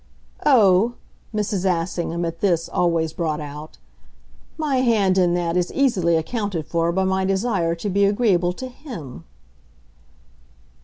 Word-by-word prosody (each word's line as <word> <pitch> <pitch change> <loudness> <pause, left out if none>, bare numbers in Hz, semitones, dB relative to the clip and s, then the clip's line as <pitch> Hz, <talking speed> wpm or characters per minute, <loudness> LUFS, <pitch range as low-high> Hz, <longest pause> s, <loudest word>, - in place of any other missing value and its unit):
"Oh," 225 -3 +5 0.4
Mrs. 210 -3 -2
Assingham, 170 -1 -1
at 165 0 -5
this, 175 -5 +1
always 165 -2 0
brought 155 -3 -2
out, 150 +1 -8 0.8
"my 300 -4 0
hand 220 -7 +2
in 175 -1 +3
that 170 -1 -1
is 180 -1 0
easily 190 -12 +2
accounted 190 -1 -3
for 170 0 0
by 190 +2 0
my 190 0 0
desire 190 -3 0
to 170 +5 -5
be 200 +1 +2
agreeable 200 -4 +2
to 260 +8 -7
HIM." 185 - -10
180 Hz, 135 wpm, -22 LUFS, 165-210 Hz, 0.8 s, Oh